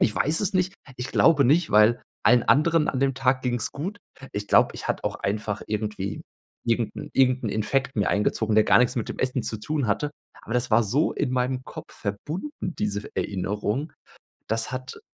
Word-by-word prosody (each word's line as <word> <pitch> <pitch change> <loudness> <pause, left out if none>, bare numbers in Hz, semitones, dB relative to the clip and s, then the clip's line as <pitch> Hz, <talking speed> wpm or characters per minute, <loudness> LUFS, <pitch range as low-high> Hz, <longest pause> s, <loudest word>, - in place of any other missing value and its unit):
Ich 105 - +2
weiß 155 +3 +1
es 200 -1 -1
nicht. 185 +1 +1 0.2
Ich 125 +1 -4
glaube 150 -2 +4
nicht, 155 +7 +3
weil 105 +3 +5 0.2
allen 120 +2 +5
anderen 165 +2 +3
an 130 - -1
dem 135 -1 +2
Tag 130 -1 +1
ging's 120 -3 -1
gut. 190 +8 -5 0.3
Ich 105 0 -4
glaube, - - +4
ich - - -6
hatte - - -2
auch - - -2
einfach 105 +1 -2
irgendwie 105 -2 -3 0.4
irgend 115 -1 0
'n 150 - -7
irgend 130 -1 +3
'n 110 - 0
Infekt 110 +6 -1
mir 105 - +2
eingezogen, 105 +1 +1
der 110 - +6
gar - - +6
nix 125 0 +3
mit 115 - -2
dem - - -6
Essen 130 -2 0
zu 110 - -3
tun 130 +4 -2
hatte. 145 +9 0 0.3
Aber 115 - -5
das 125 0 +1
war 115 +1 +4
so 140 +10 +1
in 130 -3 -2
meinem 130 0 -1
Kopf - - -10
verbunden, 150 - -4 0.3
diese 105 -1 -1
F - - -10
Erinnerung. 105 - -2 0.6
Das 115 +3 -1
hat 130 0 -6
125 Hz, 200 wpm, -25 LUFS, 105-140 Hz, 0.6 s, der